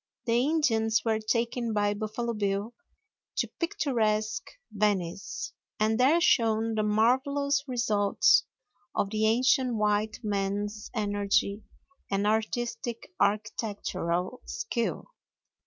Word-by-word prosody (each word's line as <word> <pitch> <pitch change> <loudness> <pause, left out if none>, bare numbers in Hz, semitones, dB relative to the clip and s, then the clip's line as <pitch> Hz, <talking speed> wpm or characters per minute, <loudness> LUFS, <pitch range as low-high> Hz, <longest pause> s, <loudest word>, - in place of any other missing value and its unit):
The 230 - +1
Indians 230 -8 +2
were 220 -1 +2
taken 230 +1 -1
by 205 -1 +2
Buffalo 220 +3 -3
Bill 205 +1 -1 0.6
to - - +1
picturesque 230 - 0 0.2
Venice, 195 -4 -1 0.3
and 220 +2 +2
there 280 +7 +5
shown 225 -8 +3
the 215 - +1
marvelous 265 +7 +2
results 215 -5 +3 0.5
of 200 - 0
the 220 0 +2
ancient 250 +2 +3
white 210 0 +1
man's 205 +1 -2
energy 205 -1 +1 0.5
and 200 +1 0
artistic 230 - -2
architectural 205 -2 -1
skill. 440 - -3
220 Hz, 100 wpm, -28 LUFS, 205-240 Hz, 0.6 s, there